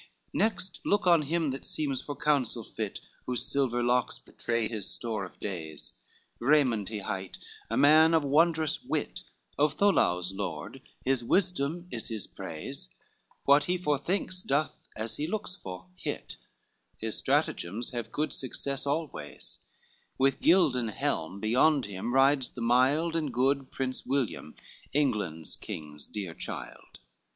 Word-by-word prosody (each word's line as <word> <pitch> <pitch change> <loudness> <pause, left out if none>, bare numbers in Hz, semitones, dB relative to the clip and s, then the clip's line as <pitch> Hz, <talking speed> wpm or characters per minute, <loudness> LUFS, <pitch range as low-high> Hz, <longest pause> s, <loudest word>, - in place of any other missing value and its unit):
LXII - - -29
"Next 195 -4 0
look 205 -1 +2
on 170 -3 +6
him 155 0 0
that 135 - -5
seems 140 -4 -1
for 145 - -5
counsel 130 -6 +1
fit, 110 -1 -5 0.3
Whose 125 -2 -1
silver 125 -3 +1
locks 125 0 +2
betray 115 -2 0
his 110 -3 -3
store 110 -4 -2
of 90 - -13
days, 80 -6 -5 0.5
Raymond 120 -7 +3
he 110 - -3
hight, 95 -2 -4 0.3
a - - 0
man 155 +3 +7
of 160 - +3
wondrous 155 +2 +3
wit, - - -2 0.4
Of 150 0 +3
Toulouse 90 - +3
lord, 95 - -5 0.2
his 130 -2 +2
wisdom 175 +1 +1
is 115 - -2
his 110 -5 -2
praise; - - -6 0.5
What 140 +1 +6
he 180 +1 +1
forethinks 180 +3 0
doth, 145 -1 -1
as 110 0 -2
he 150 - -1
looks 190 -1 -2
for, 90 -1 -8
hit, - - -5 0.6
His - - -3
stratagems 105 +8 0
have 120 -2 -4
good 150 0 -1
success 135 +2 -2
always: 140 - -3 0.6
With 135 0 +2
gilded 145 -10 +4
helm 100 - -1
beyond 130 +6 +3
him 100 +3 -4
rides 135 0 +4
the 120 - -7
mild 135 +8 +3
And 155 -4 0
good 135 +2 +1
Prince 130 -1 -2
William, 130 - -1 0.4
England's 105 - 0
king's 75 -2 -6
dear 95 -5 -5
child. - - -7
130 Hz, 145 wpm, -29 LUFS, 110-150 Hz, 0.6 s, man